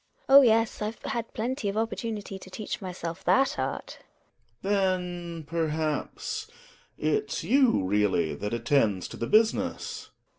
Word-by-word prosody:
GiNA. 270 - +6
Oh, 280 - +12
yes! 225 -3 +3
I've 215 +2 -3
had 235 -1 -3
plenty 235 -1 -2
of 200 - -3
opportunity 220 -3 -3
to 185 - -12
teach 210 +3 -5
myself 180 -1 -5
that 270 - +3
art. 130 +1 -4 0.6
Gregers. 200 +1 +2
Then, 180 -3 -1
perhaps, 155 -1 -2 0.5
it's 150 -2 -1
you 260 - +4
really 95 -5 +1
that 100 +8 -4
attend 115 -5 +2
to - - -7
the 115 - -3
business 220 +1 +1
185 Hz, 140 wpm, -27 LUFS, 145-220 Hz, 0.6 s, Oh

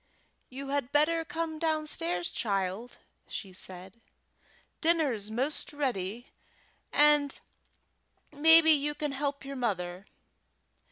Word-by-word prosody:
"You 275 +2 -7
had 280 -2 -1
better 325 +3 +3
come 325 -2 -4
downstairs, 305 - -1
child," 200 +2 -2 0.3
said - - -22 0.7
she. - - -38 0.7
"Dinner's 295 -11 +1
'most 260 +7 -1
ready, 240 -5 -3 0.6
and 295 -1 +4 0.9
mebbe 320 +2 +7
you 295 -2 +3
can 295 -1 -2
help 280 0 -3
your 275 0 -6
mother. 185 -5 -3
280 Hz, 100 wpm, -30 LUFS, 220-305 Hz, 0.9 s, mebbe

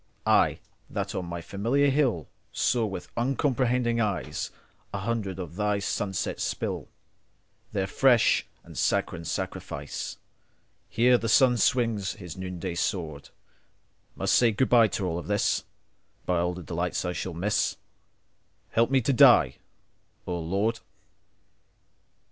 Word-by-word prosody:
I, - - +4 0.3
that - - -3
on 90 -2 -3
my 85 0 -5
familiar 120 +11 +1
hillSaw 120 - 0
with 95 -2 -7
uncomprehending 125 -1 +1
eyesA 105 -4 -2 0.4
hundred 100 -2 -2
of 90 -2 -7
Thy 105 -1 +1
sunsets 95 -1 -2
spillTheir 95 -2 -7
fresh 125 +2 +3 0.2
and - - -13
sanguine 85 - 0
sacrifice, - - -4 0.8
Ere 125 +1 +5
the 115 - -2
sun 125 +2 +5
swings 110 -5 +1
his 90 -6 -9
noonday 90 -2 -5
swordMust 80 -4 -3 1.0
say 120 - +5
good 125 +5 +1
bye 115 -2 +6
to 100 -2 -3
all 85 -1 -1
of - - -9
this:—By 95 -3 -3
all 90 +1 0
delights 90 0 -3
that 90 - -2
I - - -2
shall 90 -1 -4
miss, 100 +5 0 0.9
Help 115 +1 +3
me 135 -1 +3
to 135 +4 +1
die, 120 - +6 0.7
O 90 -1 -3
Lord. 100 +7 0
100 Hz, 120 wpm, -27 LUFS, 90-120 Hz, 1.0 s, bye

